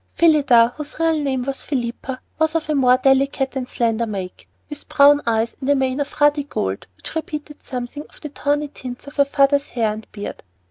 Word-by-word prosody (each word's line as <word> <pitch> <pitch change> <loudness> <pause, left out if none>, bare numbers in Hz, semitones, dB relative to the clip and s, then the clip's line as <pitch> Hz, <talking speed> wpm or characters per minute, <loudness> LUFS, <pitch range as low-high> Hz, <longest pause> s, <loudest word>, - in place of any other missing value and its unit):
Phillida, 275 -8 +5
whose 300 0 -7
real 325 -1 +2
name 265 -3 -1
was 270 +1 -4
Philippa, 255 0 -4 0.2
was 315 0 +1
of 320 -2 0
a 305 - 0
more 255 -3 +4
delicate 270 0 +2
and 255 -2 -3
slender 230 -1 0
make, 190 -4 -6 0.2
with 295 -1 -9
dark - - -13
brown 285 +1 +7
eyes 225 0 +1
and 265 - -2
a 285 - +5
mane 265 0 0
of 285 - -4
ruddy 295 0 +4
gold 95 - -3
which - - -8
repeated 300 -2 -5
something 255 +4 -6
of - - -18
the 300 - -6
tawny 290 +1 -1
tints 250 -3 -9
of 285 +1 -12
her 280 - +5
father's 280 0 +2
hair 225 -3 0
and 215 0 -10
beard. 205 -1 -7
275 Hz, 205 wpm, -21 LUFS, 245-295 Hz, 0.2 s, brown